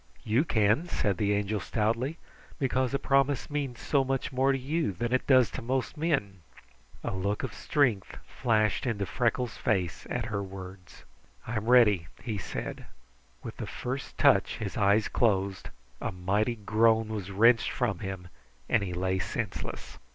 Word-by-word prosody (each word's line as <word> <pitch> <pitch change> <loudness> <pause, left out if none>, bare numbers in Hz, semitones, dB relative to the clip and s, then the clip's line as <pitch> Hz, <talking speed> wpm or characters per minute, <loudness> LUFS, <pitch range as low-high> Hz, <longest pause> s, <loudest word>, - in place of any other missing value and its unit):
"You 115 +6 +2
can," 110 +6 +2
said 100 - 0
the 105 +1 +1
Angel 105 +1 0
stoutly, 115 - -1 0.4
"because 130 -3 0
a 140 - +1
promise 140 +1 +1
means 140 -4 -3
so 140 -2 +2
much 135 +1 -2
more 135 +1 +2
to 135 - +1
you 145 - -1
than 120 +7 -2
it 130 - +1
does 130 -4 +5
to - - -5
most 130 +3 -2
men." 145 - -1 0.6
A - - -2
look 100 +2 -2
of 130 - -3
strength 125 -10 0
flashed 110 -1 0
into 100 -4 -1
Freckles' 120 +1 -1
face 95 -7 -1
at 125 -3 -2
her 105 -3 -2
words. 95 -1 -10 0.4
"I 120 - -4
am 110 +1 -4
ready," 105 -9 +5 0.2
he 110 -4 -3
said. - - -6 0.6
With - - -7
the - - -5
first 130 +2 -5
touch - - +4
his 100 -3 -5
eyes 105 0 +3
closed, 100 -4 0 0.3
a - - -2
mighty 100 +6 0
groan 110 +1 +2
was 105 -4 -4
wrenched 115 +4 +4
from 105 -8 -1
him, 95 -3 -6 0.4
and 110 - +2
he 95 -3 -3
lay 95 +1 0
senseless. 105 +2 -5
110 Hz, 165 wpm, -29 LUFS, 100-130 Hz, 0.6 s, does